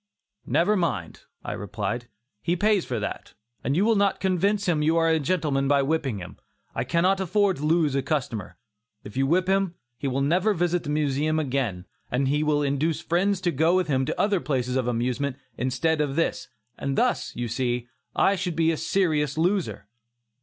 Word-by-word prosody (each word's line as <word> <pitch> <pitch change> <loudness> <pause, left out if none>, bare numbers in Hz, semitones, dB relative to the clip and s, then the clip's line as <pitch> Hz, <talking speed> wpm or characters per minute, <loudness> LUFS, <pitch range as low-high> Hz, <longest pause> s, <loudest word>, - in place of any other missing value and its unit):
"Never 200 +5 +3
mind," 130 - -2 0.2
I - - -3
replied, 105 +3 -4 0.3
"he 175 - 0
pays 205 0 +2
for 120 -3 -2
that, 105 - -5 0.3
and 135 +4 0
you 195 - +3
will 225 0 +4
not 200 -1 +2
convince 195 +2 +1
him 165 -4 +1
you 160 +2 +2
are 165 0 +3
a 160 -1 +3
gentleman 145 -3 0
by 140 0 +3
whipping 135 -6 0
him. 90 -3 -9 0.4
I - - -1
cannot 185 +3 +2
afford 195 +1 +2
to 145 - -4
lose 160 -3 +3
a 135 - +1
customer. 125 - -3 0.5
If 105 - -10
you 135 +1 +2
whip 180 +5 +2
him, 195 -2 +1 0.2
he 140 - -2
will 135 +1 0
never 180 +8 +2
visit 175 0 0
the - - -4
Museum 150 +1 +1
again, 125 -11 -2 0.2
and 130 +2 0
he 150 +2 +1
will 150 -1 +2
induce 145 +3 0
friends 180 +4 +1
to 175 - +1
go 160 +4 +3
with 185 -2 +2
him 135 -2 +2
to - - -3
other 205 -2 +2
places 130 -5 -1
of 130 -2 0
amusement 125 +3 -1 0.2
instead 130 +6 0
of 140 -2 -1
this, 165 -5 0 0.3
and 140 -1 -2
thus, - - +1
you 120 0 -2
see, 120 0 -1 0.3
I 200 - +4
should 180 -3 -3
be 165 0 +3
a 160 - -2
serious 155 -7 +1
loser." 180 - 0
155 Hz, 195 wpm, -25 LUFS, 135-175 Hz, 0.5 s, will